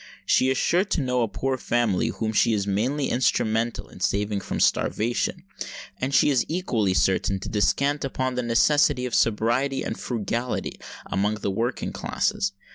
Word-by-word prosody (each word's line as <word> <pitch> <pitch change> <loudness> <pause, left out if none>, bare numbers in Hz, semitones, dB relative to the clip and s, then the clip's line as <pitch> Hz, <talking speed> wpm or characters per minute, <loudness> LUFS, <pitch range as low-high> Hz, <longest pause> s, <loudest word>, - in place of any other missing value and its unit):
She 130 - +3
is 130 - +1
sure 175 +6 +2
to 195 -3 -1
know 125 -2 0
a 115 - +2
poor 130 +4 -2
family 120 -7 +1
whom 110 -1 -2
she 115 +1 +3
is 100 -2 0
mainly 125 +9 0
instrumental 115 -2 0
in - - -14
saving 100 0 0
from - - -4
starvation; 120 +3 0 0.6
and 130 +2 -1
she 145 - +4
is 130 -3 +3
equally 120 - 0
certain 95 +1 +2
to - - -6
descant 140 +8 +1
upon 130 -1 -2
the 125 - -1
necessity 125 +2 +3
of 125 - -5
sobriety 120 +5 +1
and - - -3
frugality 120 +1 -3 0.3
amongst 105 +2 -1
the 100 - 0
working 115 +6 -2
classes. 95 0 -1
120 Hz, 165 wpm, -25 LUFS, 105-130 Hz, 0.6 s, she